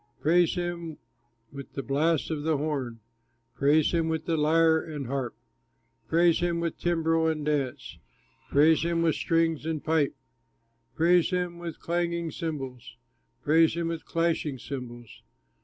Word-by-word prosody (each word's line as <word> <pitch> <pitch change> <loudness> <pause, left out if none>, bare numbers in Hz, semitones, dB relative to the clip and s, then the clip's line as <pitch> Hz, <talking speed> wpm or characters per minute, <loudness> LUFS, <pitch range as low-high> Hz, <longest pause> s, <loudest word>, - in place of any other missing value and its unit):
Praise 170 +2 +3
him 175 -3 -4 0.5
with 140 -1 -10
the 135 - -4
blast 150 +5 0
of 155 -2 -2
the 155 0 +1
horn, 135 -6 -3 0.5
Praise 145 +4 +3
him 165 -2 +1
with 160 -1 -3
lyre 160 0 +3
and 150 -4 -6
harp, 130 -1 -3 0.7
Praise 170 +2 +3
him 170 -1 0
with 170 -1 -3
timbrel 165 -1 +1
and 155 -2 -1
dance, 145 -4 -2 0.5
Praise 155 +3 +4
him 170 0 0
with 165 -2 +3
strings 165 +2 0
and 160 -1 -3
pipe, 155 -3 +1 0.8
Praise 170 +1 +4
him 180 -2 -2
with 170 -2 -7
clanging 170 -1 -2
cymbals, 135 -8 -6 0.5
Praise 160 +2 +4
him 170 -1 -2
with 165 -1 -4
clashing 165 -4 -1
cymbals. 120 -4 -8
160 Hz, 140 wpm, -27 LUFS, 145-170 Hz, 0.8 s, Praise